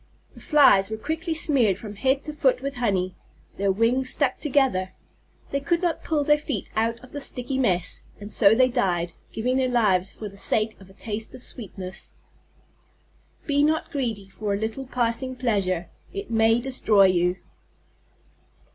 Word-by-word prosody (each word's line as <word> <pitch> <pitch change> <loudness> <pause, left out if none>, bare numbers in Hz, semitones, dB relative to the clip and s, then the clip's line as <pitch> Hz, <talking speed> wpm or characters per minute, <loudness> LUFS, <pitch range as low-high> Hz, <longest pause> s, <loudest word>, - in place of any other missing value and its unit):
The - - -14
Flies 270 -11 +5
were 220 - -4
quickly 320 +6 -3
smeared 255 - +2
from 210 0 -8
head 265 +6 +1
to 305 - -4
foot - - +2
with 275 -2 -5
honey. 190 -6 0 0.4
Their 200 0 +1
wings 235 +6 +1
stuck - - 0
together. 265 -11 +1 0.6
They 280 - 0
could 340 +5 -1
not 345 -2 -1
pull 305 -3 0
their 295 +1 +3
feet 280 -9 -4
out 230 +1 0
of 255 - -14
the 290 - -5
sticky 260 0 -4
mass. 180 -8 +1 0.2
And 205 +1 -5
so 205 -1 +6
they 255 +2 +5
died, 180 -9 -1 0.2
giving 250 +4 -1
their 260 -1 +1
lives 200 -6 +2
for 215 - -7
the 200 0 -11
sake 215 +2 +4
of 190 - -15
a - - -16
taste 215 +2 -6
of 255 - -4
sweetness. 190 -5 -5 1.3
_Be 285 -1 +2
not 315 +1 0
greedy 230 -9 -3
for 200 +1 -3
a - - -4
little 225 +5 -4
passing 250 +1 -1
pleasure. 195 -8 -1 0.2
It 200 +3 -7
may 225 +1 +3
destroy 235 -6 +3
you. 180 -1 +2
230 Hz, 170 wpm, -24 LUFS, 200-270 Hz, 1.3 s, so